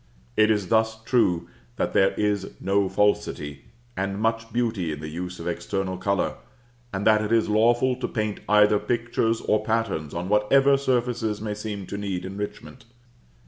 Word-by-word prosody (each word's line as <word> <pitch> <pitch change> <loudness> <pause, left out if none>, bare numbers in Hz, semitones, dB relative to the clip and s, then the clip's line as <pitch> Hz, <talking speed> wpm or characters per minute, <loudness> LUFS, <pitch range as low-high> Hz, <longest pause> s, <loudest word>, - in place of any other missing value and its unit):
It 110 - +4
is 105 -4 +1
thus 110 0 +2
true 90 -9 +2 0.3
that - - -1
there 95 0 +4
is 105 -2 0
no 100 0 +1
falsity, 75 -8 0 0.3
and 100 +1 -2
much 115 +1 -1
beauty 110 -8 -1
in 75 - -5
the 80 0 -6
use 90 +3 -6
of 85 - -6
external 95 +2 -2
color, 100 +1 -1 0.5
and 95 0 -3
that 110 -1 +5
it 105 - -3
is 115 -1 +3
lawful 120 +4 +3
to 130 - -3
paint 110 -3 -2
either 105 0 +5
pictures 115 -1 0
or 105 0 +1
patterns 110 -10 -1
on 85 +2 -3
whatever 135 +7 +4
surfaces 120 -5 0
may 105 0 -3
seem 105 -2 -5
to 100 - -6
need 95 -3 -3
enrichment. 105 +5 -7
105 Hz, 165 wpm, -25 LUFS, 95-115 Hz, 0.5 s, that